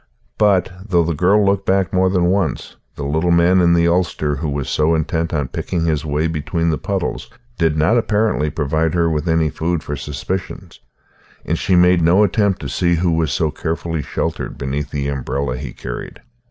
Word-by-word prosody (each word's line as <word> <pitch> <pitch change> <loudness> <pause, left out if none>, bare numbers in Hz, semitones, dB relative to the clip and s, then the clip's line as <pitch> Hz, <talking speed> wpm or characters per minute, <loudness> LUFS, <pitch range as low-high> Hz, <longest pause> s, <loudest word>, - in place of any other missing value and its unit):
But, 100 -4 +3
though 90 -5 +2
the 85 +1 -1
girl 95 +7 +3
looked 100 0 +1
back 95 -1 +1
more 95 0 +3
than 90 -2 +1
once, 95 -4 -2 0.2
the 70 - -5
little 80 +5 0
man 85 +2 +4
in 85 -1 +4
the 85 0 +3
ulster 85 -4 0
who 75 +2 -3
was 70 -1 -3
so 80 +2 +2
intent 80 +1 -1
on 75 -5 -1
picking 85 -2 -2
his 75 -3 0
way 75 +1 -1
between 80 +1 -1
the 75 - -2
puddles - - -3 0.3
did 80 -2 +2
not 100 +11 +3
apparently 105 -8 0
provide 80 +2 -1
her 85 -1 +2
with 80 +2 -1
any 80 -2 +2
food 85 -1 -2
for 75 - -4
suspicion; 90 +7 -5 0.7
and 85 - -1
she 95 - +1
made 90 0 +5
no 85 +5 +4
attempt 100 -1 +1
to - - -4
see 85 -1 +1
who 85 +1 +1
was 80 -2 0
so 80 - 0
carefully 80 0 -3
sheltered - - -4
beneath 70 +2 -3
the 70 -1 -3
umbrella 70 -1 -2
he 65 -1 -6
carried. - - -7
80 Hz, 195 wpm, -19 LUFS, 75-90 Hz, 0.7 s, made